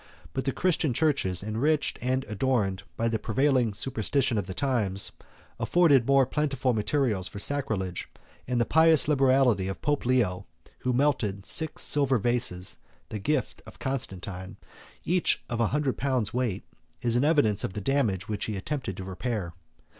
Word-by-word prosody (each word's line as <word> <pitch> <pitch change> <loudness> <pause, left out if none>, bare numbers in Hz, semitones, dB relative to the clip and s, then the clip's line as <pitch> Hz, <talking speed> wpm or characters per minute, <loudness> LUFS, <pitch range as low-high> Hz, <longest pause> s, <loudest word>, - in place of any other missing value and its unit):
But 130 - -3
the 135 - +1
Christian 160 -5 +1
churches, 115 - +1
enriched 135 +9 0
and 130 +1 0
adorned 105 -4 0 0.2
by 115 - 0
the 115 -1 0
prevailing 130 0 +1
superstition 115 +3 0
of 100 - -4
the 95 - -5
times, 110 -8 +1 0.5
afforded 145 -9 +4
more 135 -1 +5
plentiful 135 -2 0
materials 110 -3 0
for - - -9
sacrilege; 100 -7 -2 0.4
and 125 -1 0
the 120 - +2
pious 160 -1 +5
liberality 130 -8 +3
of 95 - -6
Pope 145 -4 0
Leo, 105 -7 +1 0.3
who 125 - -1
melted 120 -7 0
six 160 -1 0
silver 140 -3 +3
vases, 115 -5 -1 0.3
the 105 - -5
gift 145 +5 -1
of - - -12
Constantine, 100 -7 -4 0.5
each 180 +1 +1
of 120 - -3
a 115 - +3
hundred 145 -1 -1
pounds 125 -5 0
weight, 120 -6 -1 0.4
is 120 -1 +2
an 125 - +2
evidence 145 - +3
of - - -3
the 105 - -4
damage 110 -5 0
which 105 -2 -3
he 110 - -3
attempted 125 -2 -4
to 95 - -5
repair. 95 -1 -4
120 Hz, 160 wpm, -27 LUFS, 100-140 Hz, 0.5 s, more